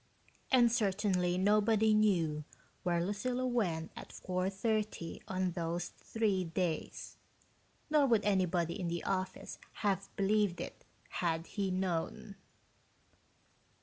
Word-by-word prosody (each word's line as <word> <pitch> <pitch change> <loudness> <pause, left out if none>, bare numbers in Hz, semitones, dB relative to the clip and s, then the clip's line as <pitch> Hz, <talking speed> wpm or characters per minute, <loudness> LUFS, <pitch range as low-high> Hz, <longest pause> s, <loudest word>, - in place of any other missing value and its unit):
And 240 -3 +6
certainly 195 -5 +1
nobody 215 +2 +4
knew 170 -8 +2 0.4
where 175 -1 +1
Lucilla 245 +6 -1
went 185 -10 0
at - - -9
4:30 195 0 -2
on 185 -1 0
those 170 0 -2
three 210 -5 -1
days 165 -1 -3 0.7
nor 300 -2 +4
would 225 -4 +3
anybody 180 -4 +1
in 180 - -2
the 170 0 -2
office 185 -1 -3 0.3
have 195 -1 +1
believed 200 -2 +2
it, - - -7 0.3
had 165 -2 -1
he 200 0 -2
known. 185 +2 -2
190 Hz, 110 wpm, -33 LUFS, 175-215 Hz, 0.7 s, And